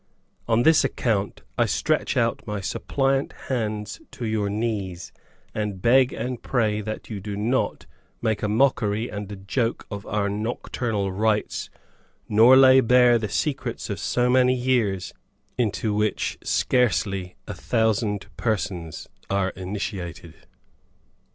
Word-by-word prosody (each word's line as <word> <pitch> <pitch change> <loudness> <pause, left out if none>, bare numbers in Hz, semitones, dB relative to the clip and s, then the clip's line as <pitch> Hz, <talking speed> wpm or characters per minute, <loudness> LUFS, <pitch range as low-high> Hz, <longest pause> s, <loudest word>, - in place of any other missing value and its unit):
On 115 +1 +3
this 160 +2 +5
account, 105 -4 -1 0.2
I - - +4
stretch - - 0
out - - 0
my 105 -1 -3
suppliant 135 +8 -1 0.2
hands 110 - -2
to 120 - -6
your 110 -2 0
knees, 100 -5 -3 0.4
and 105 -3 -3
beg 125 +5 +4
and 125 -1 -4
pray 110 -4 0
that 110 +2 -6
you 105 - -4
do 100 +1 -5
not 115 +5 -1 0.3
make 110 -3 -1
a 105 - 0
mockery 110 -1 +1
and 105 0 -6
a - - -5
joke 115 +5 -2
of 100 -1 -6
our 105 -1 0
nocturnal 105 -1 -2
rites, 105 +2 0 0.6
nor 115 +5 +7
lay 130 0 +8
bare 125 -1 +5
the 110 -2 -3
secrets 130 -7 -2
of 100 - -4
so 125 0 +1
many 125 0 +4
years, 120 -7 0 0.4
into 110 -2 0
which 105 0 -1
scarcely 100 -6 +1
a 105 - -4
thousand 105 +1 0
persons 95 -8 -3 0.2
are 100 -1 +1
initiated." 95 -2 -5
110 Hz, 130 wpm, -24 LUFS, 100-120 Hz, 0.6 s, lay